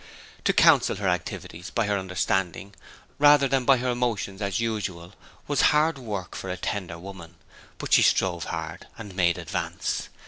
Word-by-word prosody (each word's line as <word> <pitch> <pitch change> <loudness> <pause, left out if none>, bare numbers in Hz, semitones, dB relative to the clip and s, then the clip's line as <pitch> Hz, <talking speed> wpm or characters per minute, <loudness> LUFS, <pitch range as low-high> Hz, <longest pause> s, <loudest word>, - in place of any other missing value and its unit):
To - - +4
counsel - - +5
her - - -3
activities 85 +2 -3
by 115 - 0
her 105 0 0
understanding, 95 +1 -2 0.5
rather 145 -1 +6
than 135 -1 0
by 135 0 +5
her 125 +1 -1
emotions 115 -5 -2
as 100 -2 -1
usual, 100 -6 -3 0.3
was 145 - +1 0.2
hard 155 -1 +2
work 105 -7 -5
for 95 - -6
a 90 - -3
tender 90 -3 -4
woman; 90 -2 -11 0.4
but - - -3
she - - +7
strove 85 -3 +2
hard, - - -6
and 105 -4 -9
made 85 -2 +2
advance. - - -3
100 Hz, 165 wpm, -25 LUFS, 90-120 Hz, 0.5 s, she